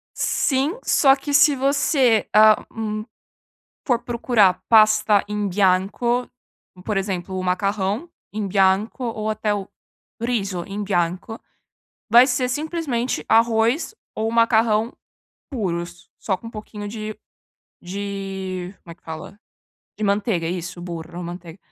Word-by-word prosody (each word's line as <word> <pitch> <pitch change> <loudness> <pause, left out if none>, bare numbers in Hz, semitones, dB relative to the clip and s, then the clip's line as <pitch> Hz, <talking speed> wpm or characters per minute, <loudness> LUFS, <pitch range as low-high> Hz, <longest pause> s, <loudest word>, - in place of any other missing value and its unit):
Sim, 280 - 0
só 270 -2 +5
que 285 +1 -5
se 290 0 +6
você, 270 -3 +2
ah, 215 0 +6
hum, 215 -1 -4 0.8
for 245 -4 +2
procurar 230 -6 +2
pasta 215 -2 +5
in 210 -1 -1
bianco 200 +6 +1 0.6
por 210 -2 -1
exemplo, 190 -1 -3
o 185 - -3
macarrão 195 - -1 0.2
in 210 -1 -2
bianco 195 +5 +1
ou 220 -2 -3
até 215 -1 -1
o 200 -1 -5 0.5
riso 200 -7 -1
in 205 +1 -4
bianco, 185 +3 -2 0.7
vai 240 +3 +8
ser 250 -1 0
simplesmente 290 -3 -2
arroz 230 - +2 0.2
ou 220 +1 -1
macarrão 230 -1 +3 0.6
puros, 175 - -4
só 190 - -1
com 230 - -13
um - - -10
pouquinho 210 -1 -8
de 215 0 -6 0.6
de 190 -1 -5
como 170 - -11
é - - -13
que - - -41
fala? 160 +5 -9 0.6
De 215 - -2
manteiga, 200 -4 0
isso. 175 0 -5
Burro, 170 0 -7
manteiga. 175 0 -8
210 Hz, 125 wpm, -22 LUFS, 190-235 Hz, 0.8 s, vai